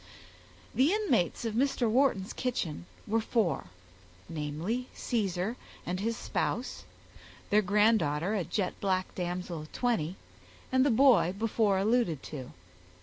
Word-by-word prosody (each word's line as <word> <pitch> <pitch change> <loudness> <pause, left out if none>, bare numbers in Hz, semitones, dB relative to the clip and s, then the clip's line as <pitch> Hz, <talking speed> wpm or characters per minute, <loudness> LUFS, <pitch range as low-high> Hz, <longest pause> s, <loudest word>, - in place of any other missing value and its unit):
The 265 +8 +4
inmates 245 - +1
of 225 - -1
Mr. 255 0 +1
Wharton's 220 -5 +2
kitchen 180 -10 -3 0.2
were 225 +2 +1
four, 210 - 0 0.6
namely, 165 +10 -3
Caesar 205 0 -1 0.3
and 180 +1 -2
his 225 +3 -1
spouse, 245 +3 -2 0.7
their 210 +1 +6
granddaughter, 200 -4 +2
a 200 -4 0
jet 185 +3 -1
black 185 -2 0
damsel 175 -2 -3
of 155 - -11
twenty, 190 -9 0 0.6
and 260 0 +4
the 285 - +3
boy 235 -7 +5
before 215 -2 +2
alluded 200 - +1
to. 130 -5 -7
205 Hz, 125 wpm, -30 LUFS, 175-235 Hz, 0.7 s, their